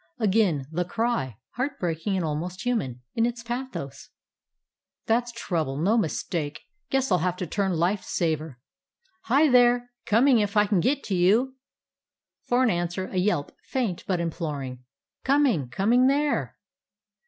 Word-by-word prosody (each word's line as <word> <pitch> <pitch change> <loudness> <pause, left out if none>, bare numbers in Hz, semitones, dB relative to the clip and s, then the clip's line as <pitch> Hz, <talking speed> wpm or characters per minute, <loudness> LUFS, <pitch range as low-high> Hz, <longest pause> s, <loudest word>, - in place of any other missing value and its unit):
Again 200 - +2
the 175 +2 0
cry, 200 - -1 0.2
heart 270 +2 -2
breaking 175 +3 -1
and 180 -3 0
almost 170 +5 -4
human 130 - -1
in 230 0 +2
its 240 0 -5
pathos. 240 - -5 1.0
"That 235 +2 +2
's - - -6
trouble, 165 - -2
no 190 +9 +2
mistake. 160 -6 -2 0.3
Guess 270 -2 0
I - - +6
'll - - +1
have 180 +2 -1
to 180 - -3
turn 190 +3 -1
life 175 +4 +1
saver. 155 -5 -2 0.7
Hi, 300 -1 +4
there! 245 -1 +4 0.2
Coming, 240 +3 +5
if 205 0 0
I 210 - +6
can 200 -2 +2
git 275 - +1
to 195 - -2
you." 220 +9 +3 0.9
For 245 +1 +1
an 245 - +3
answer, 175 +1 -2
a 185 - -4
yelp, 180 -6 +1
faint 230 -10 -2
but 185 -3 0
imploring. 145 -7 -4 0.4
"Coming, 260 - +2
coming 230 - +3
there!" 290 +2 0
195 Hz, 155 wpm, -26 LUFS, 165-245 Hz, 1.0 s, I